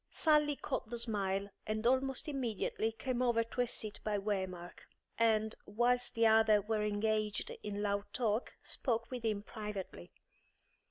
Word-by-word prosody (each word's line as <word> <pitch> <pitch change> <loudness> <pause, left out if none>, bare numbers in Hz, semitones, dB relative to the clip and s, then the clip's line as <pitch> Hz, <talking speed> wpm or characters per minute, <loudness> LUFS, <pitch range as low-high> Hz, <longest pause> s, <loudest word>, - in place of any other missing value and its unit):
Sally 300 -2 +3
caught 260 -5 -3
the 240 - -3
smile, 200 -4 0 0.2
and 215 +1 -2
almost 260 +2 +2
immediately 230 -5 -1
came 250 +2 -2
over 235 -2 +3
to 230 +2 -2
a 245 - +1
seat 215 -2 -3
by 210 -1 0
Waymark; 190 -4 -3 0.4
and, 220 -1 +3
whilst 245 +4 +1
the 230 0 +4
others 220 -2 +5
were 220 -1 +1
engaged 210 0 0
in 205 0 -3
loud 200 0 0
talk, 225 -1 -1
spoke 230 -2 -2
with 250 -2 -4
him 210 -2 0
privately. 210 - -6
220 Hz, 150 wpm, -34 LUFS, 205-240 Hz, 0.4 s, others